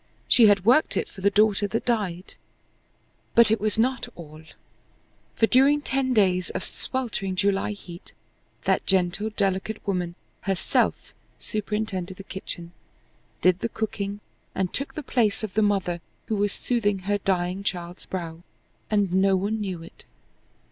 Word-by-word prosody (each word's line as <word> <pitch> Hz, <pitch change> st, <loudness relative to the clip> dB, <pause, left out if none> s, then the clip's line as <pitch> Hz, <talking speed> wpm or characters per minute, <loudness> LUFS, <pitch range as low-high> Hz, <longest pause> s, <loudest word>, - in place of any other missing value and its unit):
She 235 Hz, -3 st, +7 dB
had 200 Hz, -2 st, +4 dB
worked 255 Hz, +7 st, +4 dB
it -, -, 0 dB
for 190 Hz, -, -12 dB
the 200 Hz, -, +4 dB
daughter 205 Hz, 0 st, +3 dB
that 225 Hz, +3 st, -2 dB
died." 200 Hz, -7 st, -1 dB, 1.0 s
But 230 Hz, -2 st, +6 dB
it 220 Hz, -, +2 dB
was 215 Hz, 0 st, +2 dB
not 250 Hz, +2 st, +1 dB
all. 155 Hz, -2 st, -11 dB, 0.9 s
For 225 Hz, -, +4 dB
during 275 Hz, +5 st, +4 dB
ten 270 Hz, -1 st, 0 dB
days 185 Hz, -5 st, +3 dB
of -, -, -4 dB
sweltering 225 Hz, -7 st, -3 dB
July 200 Hz, +1 st, +1 dB
heat 175 Hz, -4 st, -11 dB, 0.5 s
that -, -, +2 dB
gentle, 190 Hz, +3 st, +2 dB
delicate 200 Hz, +1 st, -1 dB
woman 180 Hz, -3 st, -1 dB, 0.3 s
herself 195 Hz, -3 st, 0 dB, 0.2 s
superintended 205 Hz, -3 st, -3 dB
the 195 Hz, -, -8 dB
kitchen, 175 Hz, -3 st, -6 dB, 0.7 s
did 185 Hz, 0 st, +4 dB
the 230 Hz, -, -2 dB
cooking, 205 Hz, -2 st, -3 dB, 0.3 s
and 185 Hz, -2 st, -1 dB
took 275 Hz, -, -4 dB
the 305 Hz, -, -4 dB
place 225 Hz, -5 st, +1 dB
of 210 Hz, -4 st, -4 dB
the 220 Hz, -, +2 dB
mother 190 Hz, -5 st, +1 dB, 0.2 s
who 220 Hz, -, -1 dB
was 205 Hz, 0 st, +1 dB
soothing 205 Hz, -6 st, 0 dB
her 205 Hz, 0 st, +1 dB
dying 185 Hz, 0 st, 0 dB
child's 175 Hz, -2 st, -4 dB
brow, 170 Hz, -3 st, -5 dB, 0.5 s
and 205 Hz, -4 st, +1 dB
no 190 Hz, +1 st, +4 dB
one 205 Hz, +4 st, -1 dB
knew 185 Hz, -5 st, -4 dB
it. -, -, -14 dB
200 Hz, 150 wpm, -25 LUFS, 185-220 Hz, 1.0 s, She